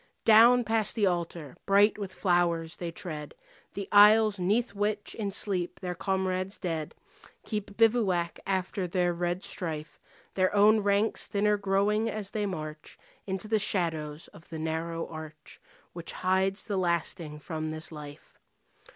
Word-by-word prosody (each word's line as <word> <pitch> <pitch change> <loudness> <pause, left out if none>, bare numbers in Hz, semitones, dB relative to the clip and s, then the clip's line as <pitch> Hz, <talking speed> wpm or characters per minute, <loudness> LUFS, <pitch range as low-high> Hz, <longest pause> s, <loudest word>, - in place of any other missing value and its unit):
Down 235 +3 +7
past 220 -1 0
the 215 -3 +2
altar, 170 -5 -2
bright 205 +2 +4
with 195 -2 -5
flowers, 175 -3 0
they 175 - -4
tread 160 -4 -7 0.4
The 200 -1 -4
aisles 210 0 +6
'neath 210 +7 +1
which 205 +1 -2
in 210 -3 -3
sleep 190 -3 -1
their 180 -1 -4
comrades 190 +1 -2
dead 160 -4 -4 0.5
Keep 210 -2 -5
bivouac 210 -7 +2
after 190 0 -1
their 175 0 +1
red 175 +2 -2
strife, 155 -3 -5 0.3
Their 185 -1 +2
own 210 +2 +6
ranks 205 +1 +1
thinner 210 +1 +2
growing 205 +2 +1
as 210 -2 -4
they 210 -1 -1
march 155 -4 -7 0.3
Into 190 +2 -3
the 215 0 +2
shadows 160 -6 -1
of 165 - -17
the 160 - -6
narrow 165 +1 -3
arch 155 -1 -10 0.3
Which 170 -1 -5
hides 190 +2 0
the 205 -3 -2
lasting 170 -3 -1
from 155 +1 -5
this 155 +1 -5
life. 150 -2 -10
185 Hz, 145 wpm, -28 LUFS, 165-205 Hz, 0.5 s, Down